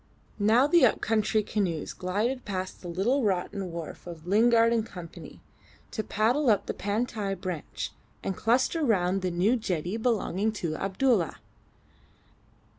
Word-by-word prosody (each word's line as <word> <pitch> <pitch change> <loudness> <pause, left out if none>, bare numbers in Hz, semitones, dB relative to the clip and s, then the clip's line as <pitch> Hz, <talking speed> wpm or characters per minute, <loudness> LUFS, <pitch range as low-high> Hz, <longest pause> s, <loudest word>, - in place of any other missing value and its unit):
Now 220 +6 +5
the 340 +2 +4
up 240 - +4
country 215 -1 +1
canoes 180 -8 -2
glided 215 +8 -1
past 185 -2 -4
the 180 - -8
little 215 +11 +1
rotten 190 -1 -1
wharf 170 +1 -7
of 165 -2 -9
Lingard 230 +4 +4
and 230 -2 +1
Co., 180 -6 -8 0.8
to 220 - -3
paddle 240 +8 +1
up 210 -3 +3
the - - -3
Pantai 205 -1 -2
branch, 180 -4 -5 0.3
and 195 - -2
cluster 255 - +1
round 195 -6 +2
the 185 - 0
new 180 +8 +2
jetty 185 -4 -2
belonging 220 -3 0
to 170 -7 -3
Abdulla. 195 - +1
205 Hz, 140 wpm, -28 LUFS, 180-230 Hz, 0.8 s, Now